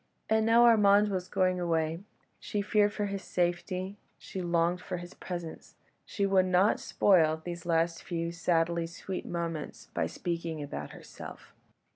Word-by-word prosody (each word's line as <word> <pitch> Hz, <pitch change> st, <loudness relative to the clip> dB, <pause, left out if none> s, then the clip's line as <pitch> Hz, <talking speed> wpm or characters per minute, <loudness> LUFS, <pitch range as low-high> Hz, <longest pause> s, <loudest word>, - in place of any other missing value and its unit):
And 220 Hz, 0 st, +3 dB
now 235 Hz, +1 st, +6 dB
Armand 210 Hz, -2 st, +6 dB
was 185 Hz, -2 st, -2 dB
going 185 Hz, -1 st, +1 dB
away; 165 Hz, -1 st, 0 dB, 0.4 s
she 205 Hz, -1 st, -2 dB
feared 205 Hz, 0 st, +3 dB
for 210 Hz, 0 st, -2 dB
his 200 Hz, -1 st, -3 dB
safety, 185 Hz, +3 st, -2 dB, 0.2 s
she 190 Hz, -, -6 dB
longed 175 Hz, 0 st, +1 dB
for 180 Hz, -, -4 dB
his 175 Hz, +1 st, -9 dB
presence. 175 Hz, -3 st, -7 dB, 0.3 s
She 200 Hz, -, -1 dB
would 190 Hz, -1 st, +3 dB
not 185 Hz, +3 st, +3 dB
spoil 160 Hz, -6 st, +3 dB
these 170 Hz, +1 st, -7 dB
last 165 Hz, 0 st, +1 dB
few 170 Hz, -1 st, -3 dB
sadly 170 Hz, 0 st, +1 dB
sweet 185 Hz, +2 st, -6 dB
moments 165 Hz, -3 st, -4 dB
by -, -, 0 dB
speaking 170 Hz, -3 st, -4 dB
about 145 Hz, -, -6 dB
herself. -, -, -11 dB
175 Hz, 150 wpm, -30 LUFS, 170-195 Hz, 0.4 s, now